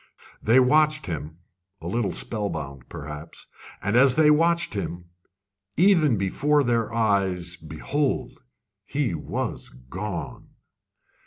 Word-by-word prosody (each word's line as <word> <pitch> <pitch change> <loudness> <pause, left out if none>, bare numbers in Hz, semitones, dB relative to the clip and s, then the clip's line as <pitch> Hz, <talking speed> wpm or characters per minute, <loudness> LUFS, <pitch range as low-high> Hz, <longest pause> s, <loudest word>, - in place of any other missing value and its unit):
They 115 +4 +5
watched 150 +3 +3
him 80 -1 -5 0.4
a 80 - -12
little 100 +2 -1
spellbound, 75 - -4
perhaps; 75 +2 -9 0.4
and 100 +4 0
as 125 +1 +6
they 155 -1 +5
watched 165 0 +2
him, 85 -4 -5 0.7
even 165 - +4
before 145 +10 +2
their 115 -3 0
eyes 95 -6 0
behold, 130 - -3 0.4
he 135 -2 -1
was 80 - -4
gone! 85 +7 -7
105 Hz, 105 wpm, -25 LUFS, 85-140 Hz, 0.7 s, as